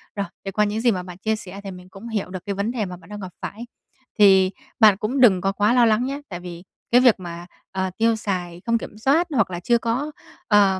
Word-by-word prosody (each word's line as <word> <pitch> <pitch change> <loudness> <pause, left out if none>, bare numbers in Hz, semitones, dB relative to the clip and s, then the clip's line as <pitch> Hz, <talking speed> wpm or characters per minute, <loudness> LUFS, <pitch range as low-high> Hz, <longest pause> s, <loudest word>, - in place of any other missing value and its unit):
Rồi, 200 -1 -1 0.2
thì 195 - -3
qua 210 +2 +2
những 210 +2 -2
gì 240 - +4
mà 185 -3 -2
bạn 180 -1 -10
chia 220 +3 0
sẻ 195 -2 -9
thì 195 - -6
mình 180 0 -12
cũng 195 +4 -11
hiểu 210 -4 -2
được 185 -1 -7
cái 200 - -3
vấn 200 +4 -1
đề 235 -4 -2
mà 180 -1 -7
bạn 180 - -18
đang 210 0 -7
gặp 185 -3 -7
phải. 230 +3 -6 0.5
Thì 190 -2 +6 0.3
bạn 215 -4 +7
cũng 225 +7 -2
đừng 195 -8 +6
có 195 +2 +1
quá 205 +3 +2
lo 245 -1 +5
lắng 225 +2 +2
nhé, 280 +2 -4
tại 175 -3 -6
vì 175 -1 -9 0.3
cái 245 +1 +6
việc 245 -4 +6
mà, 175 -1 -7 0.3
ờ, 190 -1 -1
tiêu 230 0 +3
xài 180 -5 -4
không 230 0 +2
kiểm 215 - -9
soát 285 +10 +2
hoặc 215 -6 +2
là 175 - -4
chưa 235 +7 +2
có 235 +6 -2 0.4
ờ, 200 -3 +4
205 Hz, 260 wpm, -23 LUFS, 185-230 Hz, 0.5 s, bạn